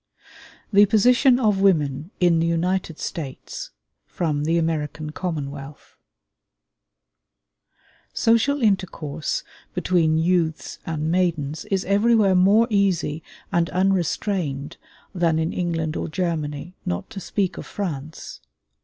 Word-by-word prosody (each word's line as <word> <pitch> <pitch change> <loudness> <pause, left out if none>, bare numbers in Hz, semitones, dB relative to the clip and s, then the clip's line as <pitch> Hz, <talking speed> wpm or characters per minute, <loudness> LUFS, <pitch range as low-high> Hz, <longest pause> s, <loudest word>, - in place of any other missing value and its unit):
THE 205 +1 +7
POSITION 245 +4 +4
OF 210 -5 +2
WOMEN 150 -5 +2
IN 175 -2 +4
THE 165 - +1
UNITED 170 0 -1
STATES 140 -6 -6 0.4
From 150 -4 -1
'The 165 +2 +2
American 155 -2 -2
Commonwealth' 145 -4 -6 2.2
Social 235 +5 +2
intercourse 170 -7 -1 0.3
between 170 -3 +2
youths 165 -1 0
and 155 0 -1
maidens 165 -5 0
is 195 -2 -1
everywhere 205 0 +4
more 200 +5 +5
easy 185 -6 +1 0.3
and 170 -1 +1
unrestrained 175 -5 -1 0.4
than 170 -3 +1
in 160 +1 -1
England 165 -3 -2
or - - -2
Germany, 160 -2 -3
not 85 0 -3
to 195 - -6
speak 195 0 -2
of - - -8
France. 155 -6 -6
170 Hz, 110 wpm, -23 LUFS, 155-195 Hz, 2.2 s, THE